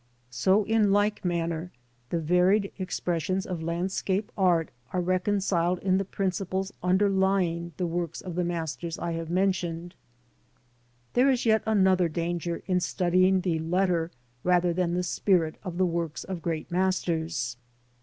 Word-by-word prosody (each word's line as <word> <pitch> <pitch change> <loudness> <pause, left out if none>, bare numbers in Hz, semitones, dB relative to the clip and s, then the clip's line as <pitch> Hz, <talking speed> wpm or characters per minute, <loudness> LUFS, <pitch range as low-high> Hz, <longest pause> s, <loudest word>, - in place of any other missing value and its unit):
So 190 - +3
in 215 -1 +2
like 205 +1 +2
manner 170 -1 -2 0.4
the 170 - 0
varied 180 +5 +3
B - - -4
X - - -32
PREFACE. 190 - -4
expressions 180 +1 -1
of 175 -3 -4
landscape 185 +4 -1
art 175 -5 +2 0.2
are 185 - +1
reconciled 185 -1 +1
in 190 +1 +1
the 195 - -1
principles 190 0 -2
underlying 190 -2 +2
the 180 - -1
works 170 -1 -3
of 180 - -6
the 180 +1 0
masters 170 -1 -3
I 170 - -3
have 165 -1 -4
mentioned. 175 -2 -1 1.2
There 255 +3 +4
is 255 -2 +1
yet 220 -1 +4
another 190 -5 +3
danger 170 +1 -3
in 180 -2 +1
studying 185 +1 +2
the 175 -4 0
letter, 170 0 +1 0.3
rather 180 -1 +3
than 175 0 0
the 180 - 0
spirit 175 -2 +1
of 180 -3 -5
the 185 - +3
works 170 -3 -2
of 185 -3 -5
great 165 0 -3
masters. 170 -8 0
180 Hz, 155 wpm, -27 LUFS, 170-190 Hz, 1.2 s, There